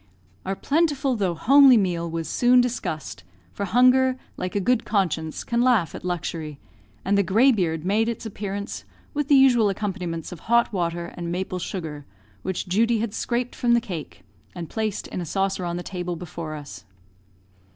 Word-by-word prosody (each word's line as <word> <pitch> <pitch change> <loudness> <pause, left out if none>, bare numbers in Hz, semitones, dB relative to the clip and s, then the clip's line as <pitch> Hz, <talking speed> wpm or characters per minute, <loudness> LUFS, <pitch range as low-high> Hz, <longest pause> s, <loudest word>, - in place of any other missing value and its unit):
Our 195 - -1
plentiful 285 - +1
though 190 -6 0
homely 270 - +7
meal 175 -4 0
was 165 -1 -4
soon 250 +6 +4
discussed, 235 - -2 0.3
for 200 - -3
hunger, 255 +4 +4 0.2
like 180 +1 -5
a - - +2
good 245 +4 +1
conscience, 165 -6 -1
can 235 0 0
laugh 240 -9 +3
at - - -8
luxury; 165 -4 -4 0.5
and 200 +2 +2
the 200 - +4
"greybeard" 190 - +2
made 215 +4 +2
its 230 0 -5
appearance, 205 -1 -5 0.3
with 295 -2 -1
the 285 - +5
usual 245 -6 +5
accompaniments 185 -5 -4
of 175 - -8
hot 235 +3 +2
water 170 -2 -2
and 170 -1 -4
maple 185 +1 -3
sugar, 160 -6 -6 0.3
which 185 - -3
Judy 225 +5 +2
had 215 -1 -2
scraped 240 +1 -2
from 235 -1 +2
the - - +4
cake, 185 -10 -7 0.3
and 170 -3 -7
placed 220 -2 -2
in 180 - -4
a - - -3
saucer 195 +2 -1
on 175 0 -3
the 175 - -5
table 180 -2 -4
before 165 -2 -6
us. 140 -12 -9
195 Hz, 170 wpm, -24 LUFS, 170-235 Hz, 0.5 s, homely